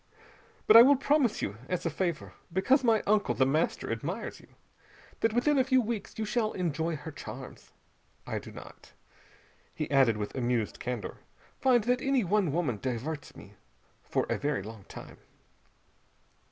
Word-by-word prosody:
But 215 - +6
I 230 - +13
will 275 +4 +7
promise 275 -3 +1
you 100 +2 -3
as 180 -1 -2
a 165 - 0
favor, 170 0 -3 0.2
because 260 - +3
my 225 -3 +3
uncle 210 0 +2
The 130 - +3
Master 150 +5 0
admires - - -4
you, - - -18 0.7
that 225 - +2
within 270 +5 +2
a - - +5
few 260 0 +3
weeks 230 -3 -4
you 220 - -2
shall 220 0 0
enjoy 165 -2 -1
her 150 +2 -8
charms. 130 -2 -10 0.5
I - - -3
do - - -11
not," - - -13 0.8
he 155 -2 -4
added 130 -6 +4
with 105 -1 -4
amused 120 -4 -1
candor, 120 -4 -4 0.4
"find 245 -4 +4
that 250 +2 +1
any 270 -3 +2
one 195 -3 +1
woman 145 -9 -1
diverts 130 +4 -4
me - - -13 0.5
for - - -1
a - - -1
very 145 -8 -1
long 110 -1 -10
time." - - -11
170 Hz, 165 wpm, -29 LUFS, -, 0.8 s, I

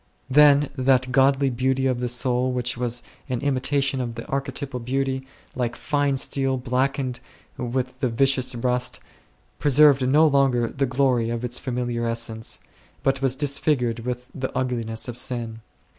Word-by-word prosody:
Then 145 0 +5
that 130 -1 +2
godly 135 +1 +3
beauty 130 +2 0
of 130 -2 +1
the 125 - -1
soul 125 +1 0
which 125 0 -1
was 120 0 -2 0.3
an 125 -2 -1
imitation 135 -1 0
of 120 -2 -4
the 115 - -6
Arche 135 0 -3
typal 135 -4 -5
Beauty, 130 +1 -2 0.3
like 120 -2 -2
fine 145 -2 0
steel 135 0 0
blackened8 130 0 -1 0.4
with 130 +1 -3
the 130 -3 0
vicious 130 +1 +2
rust, 125 +1 -1 0.6
preserved 145 -1 +5
no 150 +4 +5
longer 135 -5 +2
the 135 0 -1
glory 125 -3 +1
of 120 +1 -3
its 125 0 -3
familiar 120 -2 -3
essence, 115 -1 -2 0.4
but 135 0 +1
was 135 -1 +2
disfigured 140 -4 0
with 125 +1 -5
the 130 -1 -4
ugliness 115 -3 -2
of 120 -1 -5
sin. 115 -4 -2
130 Hz, 155 wpm, -24 LUFS, 120-135 Hz, 0.6 s, Then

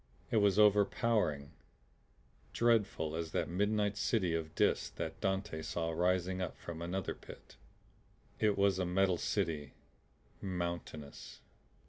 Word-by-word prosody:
It - - +3
was 100 -2 +4
overpowering 105 - +3 1.0
dreadful 105 -9 +2
as 80 -1 -4
that - - 0
midnight 105 +2 0
city 95 -6 +1
of 80 -1 -3
Dis - - +2
that 80 - -6
Dante 95 -5 -1
saw 80 +1 -2
rising 90 +2 +1
up 90 - -4
from 85 -1 -7
another 90 +2 -2
pit. - - -13 0.8
It 105 -2 +2
was 100 -1 +3
a 95 - +1
metal 90 -1 +2
city, 80 -8 -1 0.7
mountainous. 85 -5 -5
90 Hz, 120 wpm, -34 LUFS, 80-100 Hz, 1.0 s, was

